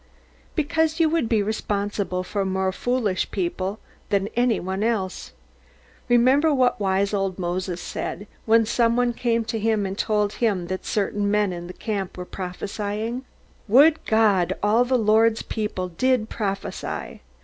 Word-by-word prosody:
Because 320 Hz, +1 st, +1 dB
you 325 Hz, -1 st, +4 dB
would 320 Hz, -8 st, 0 dB
be 220 Hz, -3 st, +2 dB
responsible 200 Hz, -3 st, -2 dB
for 200 Hz, +2 st, -2 dB
more 190 Hz, 0 st, 0 dB
foolish 220 Hz, -3 st, -1 dB
people 190 Hz, +2 st, -2 dB, 0.3 s
than 200 Hz, 0 st, +1 dB
any 240 Hz, -1 st, +1 dB
one 190 Hz, +2 st, -3 dB
else. 210 Hz, -5 st, -2 dB, 0.8 s
Remember 260 Hz, +6 st, +4 dB
what 255 Hz, -5 st, +2 dB
wise 195 Hz, 0 st, +1 dB
old 195 Hz, -2 st, -1 dB
Moses 180 Hz, 0 st, -3 dB
said, 205 Hz, -, -5 dB, 0.2 s
when 225 Hz, 0 st, +5 dB
some 230 Hz, +1 st, +2 dB
one 245 Hz, -1 st, +2 dB
came 230 Hz, -1 st, 0 dB, 0.4 s
and 190 Hz, 0 st, -3 dB
told 210 Hz, 0 st, 0 dB
him 205 Hz, -7 st, 0 dB
that 185 Hz, 0 st, -4 dB
certain 205 Hz, 0 st, 0 dB
men 205 Hz, -2 st, +2 dB
in 175 Hz, 0 st, -7 dB
the -, -, -7 dB
camp 200 Hz, -4 st, -4 dB
were 180 Hz, -, -5 dB
prophesying 205 Hz, +6 st, -4 dB, 0.4 s
"Would 290 Hz, +9 st, +5 dB
God 200 Hz, -5 st, +3 dB
all 220 Hz, +4 st, +4 dB
the 255 Hz, +1 st, +2 dB
Lord's 220 Hz, 0 st, +3 dB
people 210 Hz, -4 st, -3 dB
did 245 Hz, +5 st, +1 dB
prophesy!" 200 Hz, -3 st, -4 dB
210 Hz, 145 wpm, -24 LUFS, 190-235 Hz, 0.8 s, when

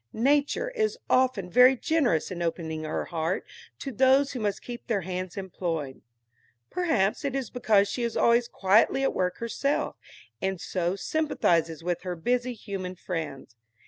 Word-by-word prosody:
Nature 285 Hz, -, +1 dB
is 440 Hz, -2 st, 0 dB
often 255 Hz, -8 st, +3 dB
very 250 Hz, +7 st, +6 dB
generous 255 Hz, -, +1 dB
in 175 Hz, -1 st, -5 dB
opening 160 Hz, -2 st, -3 dB
her 155 Hz, -, -2 dB
heart 165 Hz, +3 st, -2 dB, 0.3 s
to 275 Hz, -, -5 dB
those 265 Hz, +3 st, +4 dB
who 255 Hz, -, -5 dB
must 205 Hz, -3 st, -2 dB
keep 240 Hz, -1 st, -8 dB
their 220 Hz, -5 st, 0 dB
hands 185 Hz, +1 st, -5 dB
employed. 165 Hz, -7 st, -4 dB, 0.7 s
Perhaps 280 Hz, -, +1 dB
it 275 Hz, -2 st, -2 dB
is 265 Hz, -4 st, -3 dB
because 210 Hz, -5 st, +3 dB
she 245 Hz, -, -3 dB
is 235 Hz, -1 st, -1 dB
always 235 Hz, 0 st, +4 dB
quietly 210 Hz, +8 st, +3 dB
at -, -, +1 dB
work 180 Hz, -1 st, -1 dB
herself, 275 Hz, +5 st, -1 dB, 0.5 s
and 190 Hz, -1 st, -1 dB
so 180 Hz, -1 st, -1 dB
sympathizes 170 Hz, -, 0 dB
with 175 Hz, 0 st, -1 dB
her 180 Hz, -1 st, -4 dB
busy 245 Hz, +8 st, 0 dB
human 190 Hz, -4 st, -5 dB
friends. 155 Hz, -9 st, -5 dB
200 Hz, 155 wpm, -27 LUFS, 175-255 Hz, 0.7 s, very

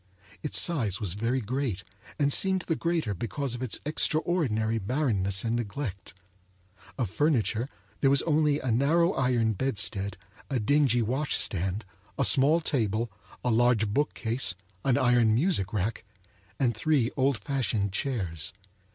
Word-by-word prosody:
Its 150 Hz, -, 0 dB
size 120 Hz, -, -1 dB
was 100 Hz, -6 st, -3 dB
very 115 Hz, +6 st, -1 dB
great, 120 Hz, -4 st, -2 dB, 0.3 s
and 145 Hz, -1 st, +3 dB
seemed 190 Hz, -1 st, +3 dB
the 165 Hz, -, -1 dB
greater 165 Hz, -10 st, -1 dB
because 120 Hz, -, -3 dB
of 120 Hz, -, -6 dB
its 125 Hz, -5 st, -2 dB
extraordinary 150 Hz, -8 st, +1 dB
barrenness 100 Hz, -5 st, 0 dB
and 115 Hz, 0 st, 0 dB
neglect. 105 Hz, -, -5 dB, 0.8 s
Of 115 Hz, -8 st, -2 dB
furniture 125 Hz, -3 st, +1 dB, 0.3 s
there 135 Hz, -, +4 dB
was 140 Hz, 0 st, +4 dB
only 150 Hz, -2 st, +2 dB
a 130 Hz, -, -2 dB
narrow 160 Hz, -, +3 dB
iron 120 Hz, -4 st, +1 dB
bedstead, 100 Hz, -4 st, -3 dB, 0.3 s
a 135 Hz, -3 st, 0 dB
dingy 125 Hz, 0 st, +3 dB
wash 130 Hz, +7 st, -1 dB
stand, 95 Hz, +3 st, -1 dB, 0.3 s
a -, -, +2 dB
small 150 Hz, +5 st, +5 dB
table, 115 Hz, -6 st, 0 dB, 0.3 s
a 125 Hz, -, +2 dB
large 115 Hz, -2 st, +3 dB
bookcase, 115 Hz, -4 st, 0 dB, 0.3 s
an 130 Hz, -3 st, +2 dB
iron 120 Hz, -3 st, +4 dB
music 130 Hz, -, +1 dB
rack, 105 Hz, +1 st, -2 dB, 0.6 s
and 120 Hz, -5 st, +1 dB
three 130 Hz, 0 st, +1 dB
old 135 Hz, -1 st, +2 dB
fashioned 115 Hz, -7 st, -1 dB
chairs. 95 Hz, -, -2 dB
120 Hz, 140 wpm, -28 LUFS, 110-145 Hz, 0.8 s, small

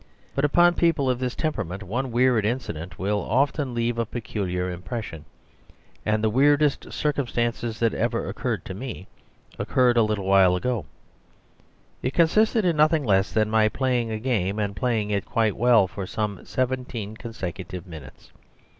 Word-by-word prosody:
But 140 Hz, -, +1 dB
upon 175 Hz, +4 st, +5 dB
people 165 Hz, -6 st, +2 dB
of 125 Hz, -, -2 dB
this 130 Hz, -1 st, -2 dB
temperament 105 Hz, -, -3 dB
one 125 Hz, +6 st, -3 dB
weird 120 Hz, -2 st, +3 dB
incident 105 Hz, -8 st, -3 dB
will 100 Hz, +3 st, 0 dB
often 135 Hz, +1 st, 0 dB
leave 115 Hz, 0 st, 0 dB
a 115 Hz, -, +1 dB
peculiar 90 Hz, -6 st, -3 dB
impression. 90 Hz, -3 st, -6 dB, 0.8 s
And 110 Hz, 0 st, 0 dB
the 110 Hz, -, +3 dB
weirdest 145 Hz, +3 st, +3 dB
circumstance 120 Hz, -5 st, -1 dB, 0.2 s
that 115 Hz, -2 st, +1 dB
ever -, -, -1 dB
occurred -, -, -3 dB
to -, -, -6 dB
me 110 Hz, -2 st, -7 dB, 0.5 s
occurred 125 Hz, -2 st, +2 dB
a -, -, +6 dB
little 105 Hz, -3 st, 0 dB
while 95 Hz, -2 st, +5 dB
ago. 120 Hz, +3 st, -2 dB, 1.1 s
It 130 Hz, -, -2 dB
consisted 215 Hz, +6 st, +3 dB
in 170 Hz, -3 st, +2 dB
nothing 155 Hz, 0 st, +4 dB
less 95 Hz, -4 st, +2 dB
than 110 Hz, -1 st, +1 dB
my 110 Hz, -1 st, +4 dB
playing 125 Hz, -2 st, 0 dB
a 110 Hz, -, -2 dB
game, 110 Hz, -5 st, -1 dB
and 100 Hz, -2 st, -2 dB
playing 110 Hz, -1 st, 0 dB
it 100 Hz, -1 st, 0 dB
quite 110 Hz, -3 st, 0 dB
well 120 Hz, -5 st, +4 dB
for 95 Hz, 0 st, -6 dB
some 105 Hz, -2 st, -3 dB
seventeen 125 Hz, -4 st, -3 dB
consecutive 95 Hz, -6 st, -6 dB
minutes. 80 Hz, -7 st, -12 dB
115 Hz, 155 wpm, -25 LUFS, 100-130 Hz, 1.1 s, a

